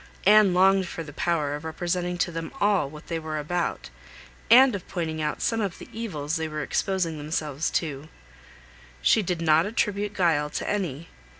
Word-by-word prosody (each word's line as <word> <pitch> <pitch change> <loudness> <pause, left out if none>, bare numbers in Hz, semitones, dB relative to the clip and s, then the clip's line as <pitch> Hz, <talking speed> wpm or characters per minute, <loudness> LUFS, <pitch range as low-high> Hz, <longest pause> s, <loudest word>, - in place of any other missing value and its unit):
Anne 210 -1 +7
longed 190 +1 +4
for 165 - -6
the 145 -2 -11
power 150 -3 0
of 150 +1 -5
representing 175 +2 -2
to 175 - 0
them 165 0 -5
all 200 -9 +2
what 150 +1 -12
they 165 -1 -3
were 155 -1 -4
about, 160 - -3 0.6
and 255 +2 +8
of 195 -3 -6
pointing 160 -3 -3
out 150 -1 -2
some 225 -1 +1
of 195 -5 -3
the - - -11
evils 160 -9 -3
they 160 0 -2
were 155 -1 -4
exposing 170 0 -1
themselves 150 0 -2
to. 150 -2 -3 0.9
She 220 - +5
did 175 -3 -2
not 160 +2 +4
attribute 205 -1 -1
guile 160 -6 +2
to - - -4
any. 170 -6 -2
170 Hz, 180 wpm, -26 LUFS, 155-195 Hz, 0.9 s, and